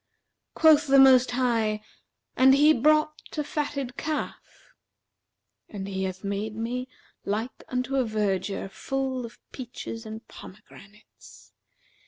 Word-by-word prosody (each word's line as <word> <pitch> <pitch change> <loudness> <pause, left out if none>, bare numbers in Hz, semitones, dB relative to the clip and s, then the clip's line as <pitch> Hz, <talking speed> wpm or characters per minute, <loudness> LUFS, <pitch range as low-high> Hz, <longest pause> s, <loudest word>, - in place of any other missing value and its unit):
Quoth 310 -1 +5
the 275 0 +5
Most 260 -1 +7
High, 230 -4 0 0.5
'And 265 +1 +6
he 300 +2 +6
brought 305 +3 +2 0.2
a 300 - 0
fatted 285 -4 -4
calf.'[FN#370] 310 -1 -3 1.4
And 195 -1 -5
He 190 -1 -2
hath 190 +1 -6
made 200 +2 -3
me 245 +3 -3 0.4
like 220 +5 -3
unto 255 +2 -2
a 260 - +3
vergier 205 -3 -2
full 260 +3 -3
of 230 - -17
peaches 240 -3 -7
and 220 +1 -9
pomegranates. 210 +1 -15
245 Hz, 120 wpm, -26 LUFS, 215-270 Hz, 1.4 s, Most